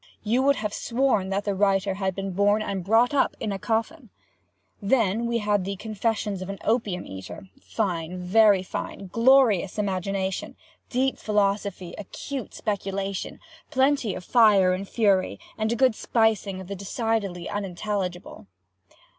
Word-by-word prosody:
You 230 +4 +2
would 280 +1 +4
have 210 -3 -3
sworn 235 -6 0
that 195 +1 -1
the 200 - 0
writer 195 0 +2
had 190 -1 -2
been 195 0 -3
born 205 +3 +2
and 195 -3 -3
brought 225 +7 +3
up 280 - +2
in 215 - -2
a 195 - -3
coffin. 230 - -2 0.7
Then 225 0 +1
we 235 0 0
had 210 -3 +1
the 195 +2 -3
'Confessions 210 -1 -2
of 185 - -6
an 195 - -4
Opium 215 -5 0
eater'—fine, 180 - -5
very 200 +1 +4
fine!—glorious 220 +1 +2
imagination—deep 195 +6 -3
philosophy 200 -3 -1
acute 255 +5 -6
speculation—plenty 200 +5 -2
of 180 - -8
fire 205 -6 +5
and 190 +2 -4
fury, 195 - +1 0.2
and 220 0 -1
a - - +1
good 255 0 +4
spicing 215 -4 0
of 190 - -8
the 200 - -5
decidedly 200 -2 -2
unintelligible. 190 - -4
200 Hz, 135 wpm, -25 LUFS, 190-225 Hz, 0.7 s, fire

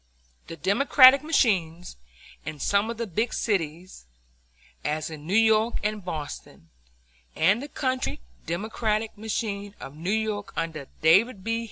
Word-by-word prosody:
The 165 - -7
Democratic 260 - +6
machines 185 - 0 0.5
in 155 -1 -6
some 200 +8 +1
of 230 - -4
the 235 - -2
big 220 +4 -2
cities, 175 - -3 0.8
as 155 +1 -2
in 155 -1 -9
New 190 - 0
York 220 +1 +3
and 210 -1 -2
Boston, 145 - -7 0.6
and 195 +9 +3
the 285 - -6
country 260 -3 -2 0.3
Democratic 215 +4 -2
machine 205 -1 -4
of 135 - -9
New 165 +4 -5
York 215 -1 -2
under 160 -4 -3 0.2
David 195 +6 +4
B. 230 +2 -1
200 Hz, 135 wpm, -26 LUFS, 165-225 Hz, 0.8 s, Democratic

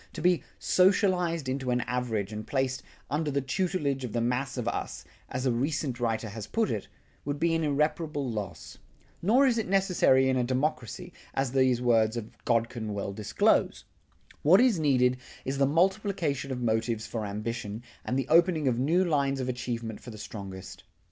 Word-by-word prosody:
To - - -6
be 180 -1 +4 0.2
"socialized 180 -5 +2
into 130 0 -2
an 125 0 +2
average" 115 -5 -2
and 105 0 -6
placed 130 -1 -1 0.3
"under 150 +1 -1
the 140 0 0
tutelage 140 -1 -1
of 120 - -5
the 120 - 0
mass 125 +4 -1
of 120 -2 -3
us," - - -3 0.2
as 130 +1 -3
a 130 - +3
recent 135 +1 -1
writer 115 -2 -1
has 110 0 -7
put 225 -2 0
it, 105 - -3 0.4
would 145 0 -3
be 165 +1 +2
an 165 0 +1
irreparable 150 0 0
loss. 100 -8 -6 0.4
Nor 240 +10 +4
is 240 -3 +3
it 220 - -2
necessary 180 -9 +3
in 130 0 +2
a 125 - +2
democracy, 130 +6 -2 0.2
as 135 -2 0
these 130 -2 +2
words 115 -1 +3
of 115 -1 -6
Godkin 115 -2 0
well 100 -1 -3
disclose. 105 0 +1 0.6
What 170 +6 +6
is 240 -8 +4
needed 125 -4 +3 0.3
is 135 +1 -2
the 135 - +4
multiplication 170 -4 0
of 125 -1 -3
motives 115 0 0
for 115 -2 -4
ambition 105 +1 -4 0.2
and 130 - -1
the 135 -2 -1
opening 165 -2 +4
of 120 -2 +1
new 170 +8 +3
lines 140 -4 +1
of 130 - -2
achievement 120 -3 -4
for - - -10
the 110 - -9
strongest. 100 -3 -8
130 Hz, 180 wpm, -28 LUFS, 115-160 Hz, 0.6 s, What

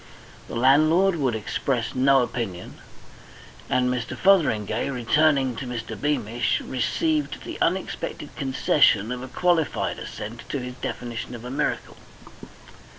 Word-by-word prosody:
The - - -7
landlord 155 +9 +4
would 130 -6 0
express 115 +2 -2
no 135 0 +4
opinion, 110 -8 -5 0.9
and 125 0 +2
Mr. 125 -1 -2
Fotheringay, 120 - +2
returning 135 +1 +2
to 130 - -5
Mr. 120 -2 -5
Beamish, 120 -5 0
received 305 - -1
the - - -7
unexpected - - -2
concession 130 -5 +2
of 125 0 -4
a 130 - -6
qualified 170 +2 0
assent 115 +3 -7
to - - -2
his 125 -1 -5
definition 120 0 -5
of 120 0 -9
a 125 - -6
miracle. 135 - -2
125 Hz, 125 wpm, -24 LUFS, 120-145 Hz, 0.9 s, landlord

